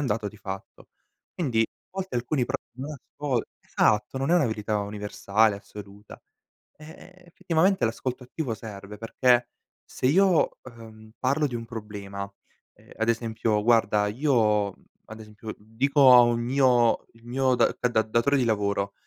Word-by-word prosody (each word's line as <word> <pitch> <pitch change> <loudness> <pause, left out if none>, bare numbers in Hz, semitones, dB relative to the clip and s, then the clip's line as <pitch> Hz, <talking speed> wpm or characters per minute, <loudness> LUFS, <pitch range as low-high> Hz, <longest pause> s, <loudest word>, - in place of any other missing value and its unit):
un 145 - -1
dato 105 0 -3
di 105 - -14
fatto. 95 -1 -9 0.5
Quindi 125 -10 0
a - - -8
volte 190 -7 -4
alcuni 125 +2 0
pro - - -2 0.2
non 140 +3 -5
ascol 140 -2 -3 0.2
esatto 105 +5 +1
non 135 +4 -1
è - - +5
una 160 -7 +3
verità 105 -1 -2
universale 105 +1 0
assoluta, 100 0 -12 0.6
eh, 155 +4 -14
effettivamente 170 -1 +1
l'ascolto 125 +3 -3
attivo 125 -1 -4
serve 105 -1 -9
perché 120 +2 +2 0.4
se - - -5
io, 180 +4 +3
uhm, 110 -3 -13
parlo 140 +4 +1
di 125 -4 -3
un 115 0 -5
problema, 100 -3 -7 0.5
ehm, - - -22
ad 115 +1 -1
esempio: 110 -2 0
"Guarda 110 -2 +3
io" 110 -4 +2 0.4
ad 110 - -9
esempio 110 0 -9
dico 130 +5 +4
a 125 - +9
un 120 -1 +2
mio 125 -1 +2
il 115 0 -21
mio 130 +1 +1
da - - +2
da 125 - +1
da 110 -2 +2
datore 115 +6 +1
di 125 - +1
lavoro: 100 -2 0
115 Hz, 155 wpm, -26 LUFS, 105-130 Hz, 0.6 s, a